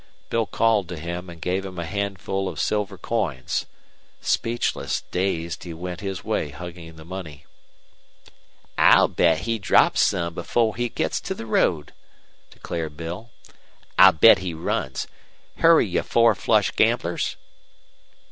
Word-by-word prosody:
Bill 115 -2 +1
called 105 -1 +1
to 90 - -5
him 85 +3 -6
and 85 -1 -11
gave 90 +4 -1
him 95 -2 -8
a 85 - -3
handful 95 +1 -3
of - - -8
silver 105 -2 -1
coins. 90 - -2 0.5
Speechless, 120 +1 -1
dazed, 90 -2 -2
he 85 -2 -7
went 90 +1 -6
his 95 -3 -5
way - - -1
hugging 85 +1 -9
the 80 0 -13
money. 85 -5 -8 1.3
"I'll - - +7
bet 80 -2 +2
he 115 -1 -2
drops 95 - +4
some 85 0 +1
before 110 +5 0
he 120 0 -1
gits - - -2
to 190 - -4
the 115 - -7
road," 80 -8 0 0.6
declared 80 -3 -6
Bill. 85 +7 -6 0.7
"I'll - - +10
bet 110 +8 +7
he 90 -3 -4
runs. 65 -4 -2 0.5
Hurry, 165 -4 +5
you 90 - 0
four 115 -1 +3
flush - - +2
gamblers." - - 0
90 Hz, 140 wpm, -23 LUFS, 85-105 Hz, 1.3 s, I'll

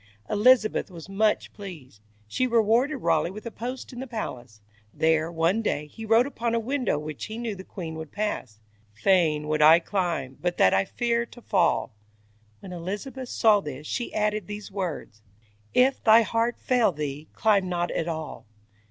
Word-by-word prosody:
Elizabeth 215 0 +4
was 170 -4 -10
much 210 +2 0
pleased; 160 - -10 0.3
she 255 - 0
rewarded 235 +4 +2
Raleigh 165 0 +2
with 210 +5 -9
a 235 - -5
post 250 +4 -6
in 245 - -8
the 265 - -5
palace. 125 - -6 0.3
There, 160 +3 +1
one 170 +6 +1
day, 150 -8 -1
he 220 +9 -10
wrote 225 +3 +5
upon 235 -4 -2
a - - +2
window 255 - -1
which 150 -1 -6
he 215 +1 -7
knew 235 -2 -3
the 190 -1 -9
queen 170 -4 -7
would 160 -2 -8
pass: 205 - -3 0.4
"Fain 155 - +2
would 155 0 0
I 155 +2 +9
climb, 170 -8 -2
but 175 0 -1
that 95 - +5
I 95 0 +3
fear 235 -1 -1
to 240 - -14
fall". - - +1 0.7
When 185 - -9
Elizabeth 210 +9 -5
saw 215 -2 +4
this, 145 -2 -7
she 240 - -3
added 210 -2 -1
these 205 0 -7
words: 175 - -5 0.5
"If 260 +2 +3
thy 225 +1 +7
heart 230 +2 0
fail 245 -5 +2
thee, 150 -1 -5
climb 200 -4 +2
not 175 -1 -1
at 165 - -2
all". 160 -7 -5
195 Hz, 175 wpm, -26 LUFS, 160-230 Hz, 0.7 s, I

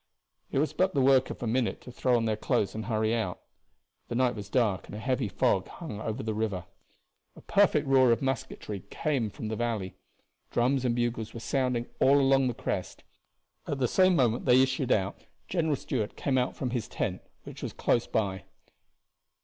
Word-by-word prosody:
It - - -2
was 150 +3 +1
but 185 0 +1
the - - +3
work 130 0 +4
of - - -6
a - - -1
minute 120 +1 0
to 125 - -10
throw 125 +1 +1
on 115 - 0
their 110 -1 +1
clothes 105 -1 0
and 110 0 -5
hurry 110 -1 +1
out. 110 -6 -2 0.7
The 120 - -4
night 125 0 +2
was 105 -3 -8
dark 105 -6 +1
and - - -8
a - - -5
heavy 130 0 0
fog 95 - +1
hung 105 - -7
over 110 -1 -3
the 110 0 -2
river. 105 -5 -2 0.7
A - - -13
perfect 185 -7 +3
roar 130 -2 +5
of 115 - +3
musketry 130 -6 -3
came 140 -7 -1
up 105 - -10
from 110 - -5
the 110 - -2
valley. 110 -5 -2 0.6
Drums 130 +2 +1
and 120 -1 +1
bugles 120 -2 -2
were - - -5
sounding 125 -1 0
all 140 +2 +5
along 135 -1 +4
the 125 - -2
crest. - - -4 0.6
At 145 - -2
the 130 -2 +1
same 185 +6 +4
moment 120 -5 +2
they 130 0 +6
issued 130 -1 -1
out 95 -1 +1 0.3
General 160 -4 +1
Stuart 115 -5 -3
came 130 -2 +1
out 125 - -1
from 125 -3 -3
his 120 -3 -2
tent, - - -3 0.2
which - - -10
was - - -4
close 120 - +1
by. 95 -4 -1
120 Hz, 200 wpm, -29 LUFS, 110-135 Hz, 0.7 s, they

